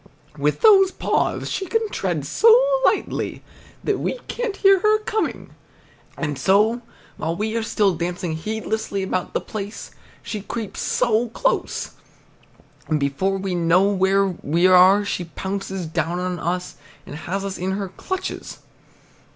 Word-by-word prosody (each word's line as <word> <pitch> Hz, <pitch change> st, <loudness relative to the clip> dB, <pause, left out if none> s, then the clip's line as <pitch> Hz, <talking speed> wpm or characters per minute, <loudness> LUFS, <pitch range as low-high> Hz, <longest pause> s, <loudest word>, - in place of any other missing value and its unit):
With -, -, 0 dB
those 395 Hz, -4 st, +7 dB
paws -, -, -1 dB
she 385 Hz, -, -3 dB
can 450 Hz, +2 st, 0 dB
tread 170 Hz, -7 st, -2 dB
so 450 Hz, -, +5 dB, 0.3 s
lightly -, -, 0 dB, 0.4 s
that -, -, 0 dB
we -, -, -2 dB
can't 475 Hz, -4 st, -3 dB
hear 390 Hz, -1 st, +5 dB
her 425 Hz, +3 st, +4 dB
coming. 430 Hz, 0 st, -3 dB, 0.7 s
And 145 Hz, -4 st, -3 dB
so, 210 Hz, -, +3 dB, 0.4 s
while 165 Hz, +1 st, -2 dB
we 215 Hz, +4 st, -2 dB
are 230 Hz, -, +1 dB
still 210 Hz, -3 st, +1 dB
dancing 175 Hz, 0 st, -3 dB
heedlessly 215 Hz, +2 st, -3 dB
about 185 Hz, -1 st, -3 dB
the -, -, +3 dB
place, 210 Hz, -1 st, -7 dB, 0.3 s
she 210 Hz, -, -5 dB
creeps 220 Hz, 0 st, -4 dB
close 235 Hz, -, 0 dB, 0.4 s
up, -, -, -24 dB, 1.0 s
and 155 Hz, -1 st, +1 dB
before 145 Hz, +8 st, 0 dB
we 190 Hz, -1 st, -3 dB
know 175 Hz, +3 st, +3 dB
where 195 Hz, 0 st, +3 dB
we 175 Hz, -2 st, 0 dB
are 185 Hz, +2 st, +6 dB
she 180 Hz, -3 st, -2 dB
pounces 190 Hz, +2 st, -4 dB
down 165 Hz, +1 st, -2 dB
on 180 Hz, -1 st, -3 dB
us 180 Hz, +1 st, -3 dB, 0.3 s
and -, -, -9 dB
has 195 Hz, +5 st, -4 dB
us 195 Hz, -1 st, -5 dB
in 185 Hz, +2 st, -1 dB
her 195 Hz, -1 st, -3 dB
clutches. 375 Hz, -, -5 dB
195 Hz, 145 wpm, -22 LUFS, 175-220 Hz, 1.0 s, those